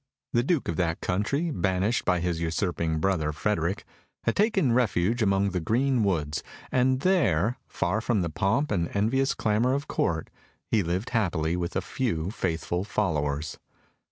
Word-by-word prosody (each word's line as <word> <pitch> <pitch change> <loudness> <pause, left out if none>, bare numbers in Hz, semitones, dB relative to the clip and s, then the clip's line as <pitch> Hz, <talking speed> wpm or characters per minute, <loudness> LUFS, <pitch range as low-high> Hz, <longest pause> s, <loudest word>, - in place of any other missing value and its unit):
The 120 - +4
Duke 145 +3 0
of 85 - -2
that 85 -2 0
country, 140 - 0
banished 95 - 0
by 90 -2 +2
his 85 -1 -1
usurping 85 -1 -1
brother 80 -2 +1
Frederick, 90 +2 -1 0.4
had 115 - +1
taken 195 - +3
refuge 115 -1 +2
among 100 -1 +2
the 90 - -1
green 120 +7 +1
woods, 75 -7 0 0.3
and 130 +1 +2
there, 120 - +2
far 95 +4 -1
from 110 -5 +1
the 85 - -1
pomp 110 - +1
and 85 -5 0
envious 130 +7 +2
clamour 110 +4 +1
of 140 +2 -3
Court, 80 -1 -1 0.3
he 110 - +2
lived 90 +6 -2
happily 85 -8 +1
with 90 0 -3
a - - +1
few 95 -9 -2
faithful 85 -2 -2
followers. 75 -8 -1
95 Hz, 155 wpm, -27 LUFS, 85-120 Hz, 0.4 s, The